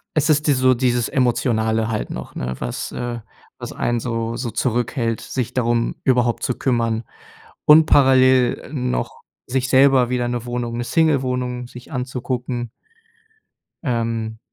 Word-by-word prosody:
Es 155 Hz, 0 st, +2 dB
ist 150 Hz, 0 st, +2 dB
die 145 Hz, -, +5 dB
so 130 Hz, -1 st, +4 dB
dieses 120 Hz, -1 st, 0 dB
Emotionale 115 Hz, -3 st, +1 dB
halt 110 Hz, -2 st, -3 dB
noch -, -, -7 dB
'ne? 65 Hz, 0 st, -3 dB
Was 60 Hz, -1 st, -4 dB
äh, 120 Hz, -1 st, -4 dB, 0.4 s
was -, -, -6 dB
einen 120 Hz, 0 st, -1 dB
so 115 Hz, -1 st, -3 dB
so 120 Hz, 0 st, -3 dB
zurückhält, 120 Hz, -1 st, -1 dB
sich 125 Hz, -4 st, -4 dB
darum 120 Hz, -2 st, 0 dB
überhaupt 125 Hz, -2 st, +1 dB
zu 125 Hz, -, 0 dB
kümmern 115 Hz, -3 st, 0 dB, 0.6 s
und 155 Hz, +1 st, +8 dB
parallel 130 Hz, -3 st, +4 dB
noch 60 Hz, -1 st, -3 dB, 0.3 s
sich 130 Hz, +1 st, -1 dB
selber 130 Hz, -2 st, +5 dB
wieder 125 Hz, -1 st, 0 dB
'ne 120 Hz, -1 st, -3 dB
Wohnung 120 Hz, -1 st, -3 dB
'ne 120 Hz, -, -2 dB
Single-Wohnung 125 Hz, -4 st, 0 dB
sich 125 Hz, 0 st, -13 dB
anzugucken. 125 Hz, -1 st, -3 dB, 1.1 s
Ähm, 115 Hz, -3 st, -2 dB
120 Hz, 140 wpm, -21 LUFS, 115-130 Hz, 1.1 s, und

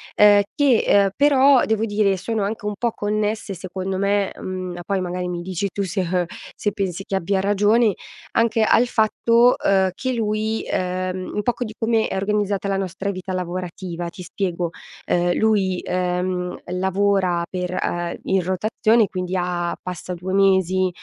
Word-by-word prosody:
ehm, 205 Hz, -1 st, +7 dB
che, 275 Hz, -5 st, +4 dB
ehm, 200 Hz, -1 st, +5 dB
però 280 Hz, -2 st, +5 dB
devo 220 Hz, 0 st, 0 dB
dire 205 Hz, -2 st, +2 dB
sono 210 Hz, +3 st, -2 dB
anche 210 Hz, +1 st, -4 dB
un 210 Hz, -, -1 dB
po' 235 Hz, -1 st, 0 dB
connesse 210 Hz, -1 st, -2 dB
secondo 185 Hz, +1 st, -4 dB
me, 200 Hz, 0 st, +1 dB
mhmm, 185 Hz, -1 st, -5 dB
poi 195 Hz, -2 st, 0 dB
magari 180 Hz, 0 st, -3 dB
mi 175 Hz, -1 st, -4 dB
dici 185 Hz, +2 st, -2 dB
tu 200 Hz, -, -1 dB
se, 190 Hz, +1 st, -2 dB
uhm 180 Hz, -1 st, +1 dB, 0.3 s
se 205 Hz, -, -1 dB
pensi 195 Hz, -1 st, -3 dB
che 195 Hz, -, -3 dB
abbia 190 Hz, +1 st, 0 dB
ragione, 205 Hz, +2 st, +3 dB, 0.4 s
anche 230 Hz, -1 st, +2 dB
al 240 Hz, +3 st, +4 dB
fatto, 230 Hz, +2 st, +3 dB
uhm, 190 Hz, -1 st, +3 dB
che 260 Hz, +4 st, -3 dB
lui, 220 Hz, -1 st, -1 dB
ehm, 185 Hz, 0 st, -2 dB
un 210 Hz, -, 0 dB
poco 245 Hz, 0 st, -1 dB
di 215 Hz, -, -7 dB
come 225 Hz, -1 st, +1 dB
è -, -, -4 dB
organizzata 200 Hz, 0 st, -1 dB
la 195 Hz, -, 0 dB
nostra 195 Hz, +1 st, -3 dB
vita 185 Hz, 0 st, -6 dB
lavorativa. 180 Hz, -1 st, -4 dB
Ti 180 Hz, -, -10 dB
spiego: 175 Hz, -1 st, -2 dB, 0.4 s
ehm, 175 Hz, 0 st, +1 dB
lui, 200 Hz, -4 st, +2 dB
ehm, 180 Hz, 0 st, -1 dB
lavora 190 Hz, -1 st, +1 dB
per, 180 Hz, -1 st, -3 dB
uhm 175 Hz, -1 st, -2 dB
in 190 Hz, -1 st, +1 dB
rotazione, 215 Hz, +4 st, +2 dB
quindi 185 Hz, 0 st, -3 dB
a 175 Hz, -1 st, -1 dB
passa 180 Hz, 0 st, -6 dB
2 180 Hz, +2 st, -5 dB
mesi, 190 Hz, -1 st, +3 dB
195 Hz, 165 wpm, -22 LUFS, 180-210 Hz, 0.4 s, ehm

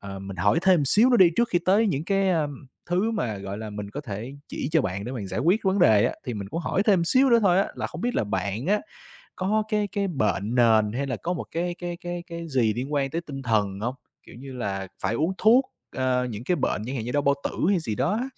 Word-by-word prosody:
ờ, 100 Hz, -1 st, -7 dB
mình 95 Hz, -1 st, -8 dB
hỏi 100 Hz, -, +2 dB
thêm 185 Hz, -3 st, +5 dB
một -, -, +1 dB
xíu 225 Hz, -, +6 dB
nữa 245 Hz, -, +5 dB
đi, 180 Hz, -4 st, +7 dB
trước 235 Hz, 0 st, +2 dB
khi 175 Hz, -, +2 dB
tới 205 Hz, +4 st, +4 dB
những 155 Hz, -4 st, -1 dB
cái, 195 Hz, 0 st, +1 dB
a, 160 Hz, -4 st, +1 dB, 0.4 s
thứ 185 Hz, +6 st, +1 dB
mà, 120 Hz, -, -2 dB
gọi 100 Hz, +1 st, -6 dB
là, 110 Hz, -1 st, -6 dB
mình 105 Hz, -1 st, -6 dB
có 145 Hz, -, -5 dB
thể 120 Hz, 0 st, -6 dB
chỉ 135 Hz, -, -4 dB
cho 160 Hz, -, +4 dB
bạn 100 Hz, 0 st, -3 dB
để 125 Hz, -, -5 dB
bạn 110 Hz, -6 st, -5 dB
giải 110 Hz, -, -3 dB
quyết 180 Hz, +9 st, +3 dB
vấn 190 Hz, +1 st, +2 dB
đề 110 Hz, -, +5 dB
á, -, -, +1 dB
thì 125 Hz, -, -4 dB
mình 100 Hz, -2 st, -6 dB
cũng 165 Hz, -, -3 dB
hỏi 190 Hz, -, 0 dB
thêm 195 Hz, -5 st, +3 dB
xíu 260 Hz, +7 st, +4 dB
nữa 235 Hz, -, +6 dB
thôi 185 Hz, -1 st, +4 dB
á, 195 Hz, -, +1 dB
là -, -, -3 dB
không -, -, -8 dB
biết 245 Hz, +2 st, -1 dB
là -, -, +1 dB
bạn 100 Hz, -, -3 dB
á, 210 Hz, +2 st, +2 dB, 0.6 s
có 210 Hz, +4 st, +1 dB
cái 210 Hz, -2 st, 0 dB
cái 200 Hz, -2 st, -1 dB
bệnh 110 Hz, -, -1 dB
nền 110 Hz, -3 st, +4 dB
hay 140 Hz, +3 st, -2 dB
là 125 Hz, -4 st, -2 dB
có 175 Hz, -, -3 dB
một 175 Hz, -, -4 dB
cái 175 Hz, +1 st, -2 dB
cái 175 Hz, -1 st, -5 dB
cái 175 Hz, 0 st, -6 dB
cái 170 Hz, -1 st, -7 dB
gì 120 Hz, -6 st, +2 dB
liên 130 Hz, +5 st, -4 dB
quan 135 Hz, -2 st, 0 dB
tới 165 Hz, -, -2 dB
tinh 140 Hz, -5 st, -8 dB
thần 105 Hz, -4 st, 0 dB
hông? 120 Hz, +3 st, -2 dB, 0.3 s
Kiểu -, -, -15 dB
như 135 Hz, +1 st, -9 dB
là, 100 Hz, -6 st, -4 dB
phải 100 Hz, +4 st, 0 dB
uống 160 Hz, +8 st, 0 dB
thuốc, 240 Hz, +5 st, +5 dB, 0.3 s
ờ, 130 Hz, -1 st, +1 dB
những 110 Hz, +2 st, -7 dB
cái 175 Hz, +6 st, +1 dB
bệnh -, -, -1 dB
chẳng 130 Hz, -, -4 dB
hạn 110 Hz, -, -3 dB
như 125 Hz, -, -4 dB
đau 145 Hz, 0 st, +1 dB
bao 140 Hz, 0 st, +3 dB
tử -, -, -1 dB, 0.2 s
hay 195 Hz, -3 st, +3 dB
gì 115 Hz, -8 st, -3 dB
đó 130 Hz, -, 0 dB
á? 225 Hz, +5 st, -1 dB
140 Hz, 280 wpm, -25 LUFS, -, 0.6 s, đi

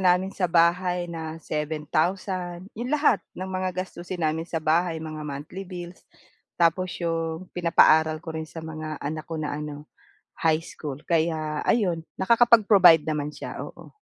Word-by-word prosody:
namin 185 Hz, +1 st, +3 dB
sa 180 Hz, -3 st, 0 dB
bahay 175 Hz, +1 st, +3 dB
na 160 Hz, -2 st, -6 dB
7,000, 175 Hz, +4 st, -2 dB
'yong 235 Hz, +3 st, -5 dB
lahat 290 Hz, -6 st, +3 dB, 0.2 s
ng 185 Hz, -, -4 dB
mga 185 Hz, 0 st, -2 dB, 0.2 s
gastusin 175 Hz, -1 st, -6 dB
namin 160 Hz, +2 st, -1 dB
sa 160 Hz, -2 st, -3 dB
bahay, 165 Hz, +2 st, +2 dB
mga 155 Hz, -1 st, -6 dB
monthly 145 Hz, +7 st, -6 dB
bills. 175 Hz, -1 st, -8 dB, 0.6 s
Tapos 175 Hz, +2 st, +2 dB
'yong 165 Hz, +1 st, -3 dB
pinapaaral 160 Hz, -2 st, +4 dB
ko 160 Hz, -, -5 dB
rin 160 Hz, 0 st, -5 dB
sa 165 Hz, -1 st, -8 dB
mga 155 Hz, -1 st, -5 dB
anak 155 Hz, +3 st, -5 dB
ko 165 Hz, -, -4 dB
na 155 Hz, -1 st, -3 dB
ano, 150 Hz, -1 st, -6 dB, 0.6 s
high 160 Hz, -1 st, +3 dB
school. 145 Hz, -5 st, -6 dB
Kaya 160 Hz, -2 st, 0 dB
ayun, 185 Hz, -8 st, +2 dB, 0.2 s
nakakapag-provide 205 Hz, -6 st, +6 dB
naman 150 Hz, -2 st, -2 dB
siya, -, -, -7 dB
oo. -, -, -10 dB
165 Hz, 150 wpm, -25 LUFS, 155-180 Hz, 0.6 s, nakakapag-provide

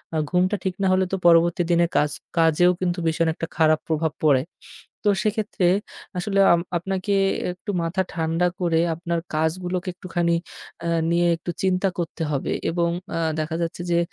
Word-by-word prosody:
আ -, -, +1 dB
ঘুমটা 185 Hz, +3 st, +2 dB
ঠিক 190 Hz, -, -1 dB
না 195 Hz, -, +2 dB
হলে 185 Hz, 0 st, +3 dB
তো -, -, +1 dB
পরবর্তী 170 Hz, +1 st, +5 dB
দিনের 170 Hz, 0 st, +3 dB
কাজ 150 Hz, 0 st, +2 dB, 0.3 s
কাজেও 165 Hz, +2 st, +4 dB
কিন্তু 175 Hz, -1 st, 0 dB
ভীষণ 165 Hz, +1 st, +1 dB
একটা 165 Hz, -, -5 dB
খারাপ 155 Hz, -2 st, +4 dB
প্রভাব 160 Hz, 0 st, 0 dB
পড়ে। 140 Hz, -4 st, +4 dB, 0.7 s
তো -, -, +6 dB
সেক্ষেত্রে 210 Hz, -3 st, 0 dB, 0.5 s
আসলে 195 Hz, +2 st, -1 dB
আম 170 Hz, -, +3 dB, 0.2 s
আপনাকে 190 Hz, +3 st, -2 dB, 0.4 s
একটু 180 Hz, +3 st, -7 dB
মাথা 170 Hz, +3 st, 0 dB
ঠান্ডা 165 Hz, +1 st, 0 dB
করে 170 Hz, -2 st, +2 dB, 0.2 s
আপনার 170 Hz, +1 st, -2 dB, 0.2 s
কাজগুলোকে 175 Hz, +4 st, -1 dB
একটুখানি 175 Hz, -1 st, -1 dB, 0.5 s
আ -, -, -3 dB, 0.2 s
নিয়ে 170 Hz, +1 st, +3 dB
একটু 170 Hz, +1 st, -6 dB
চিন্তা 190 Hz, 0 st, +2 dB
করতে 165 Hz, -1 st, -3 dB
হবে 140 Hz, -, -1 dB, 0.2 s
এবং 170 Hz, 0 st, +1 dB, 0.3 s
আ -, -, 0 dB, 0.2 s
দেখা 155 Hz, +1 st, -2 dB
যাচ্ছে 170 Hz, +1 st, -3 dB
যে 170 Hz, -, +3 dB
170 Hz, 165 wpm, -23 LUFS, 165-185 Hz, 0.7 s, তো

